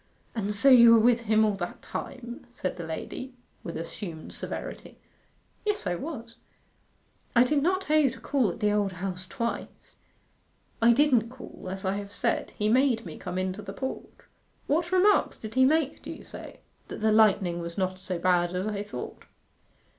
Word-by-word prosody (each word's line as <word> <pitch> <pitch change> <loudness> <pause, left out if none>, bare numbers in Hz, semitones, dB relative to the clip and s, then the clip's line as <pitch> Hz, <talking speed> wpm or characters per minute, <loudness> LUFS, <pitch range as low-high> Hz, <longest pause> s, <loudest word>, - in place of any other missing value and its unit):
'And 210 -2 -1
so 225 +7 +3
you 235 -3 +9
were - - +6
with 235 +1 +4
him 220 0 +5
all 210 - +2
that 175 -2 -5
time?' 240 -2 -7
said 185 - -3
the 170 -2 -6
lady, 250 +10 -6 0.3
with 170 - -5
assumed 165 0 -7
severity. - - -7 0.7
'Yes, 420 -1 -1
I 180 - 0
was.' 230 - -6 1.0
'I 240 - +7
did 280 +3 +2
not 370 +5 +2
tell 310 -4 +3
you 285 -3 +4
to 245 - -10
call 265 -8 +1
at 175 - -7
the 210 0 +3
Old 205 -2 +1
House 185 +1 -5
twice.' 235 +2 -5 0.8
'I 235 +1 +7
didn't 250 -4 +3
call, 255 -6 -11
as 190 +1 -5
I 190 +1 0
have 200 0 -7
said. 235 - 0
He 210 - +1
made 240 0 +3
me - - -7
come 180 -1 -5
into 185 +2 -2
the 210 - -7
porch.' 265 0 -4 0.6
'What 335 +4 0
remarks 380 +3 +4
did 220 0 -8
he 260 +1 +5
make, 300 0 +1
do - - -9
you - - -8
say?' - - -10 0.3
'That - - -7
the 220 0 +3
lightning 195 -5 +4
was 170 0 -6
not 185 -1 -1
so 185 -1 -3
bad 175 0 +2
as 185 +2 -1
I 210 -2 -2
thought. 205 0 -7
220 Hz, 185 wpm, -28 LUFS, 185-260 Hz, 1.0 s, you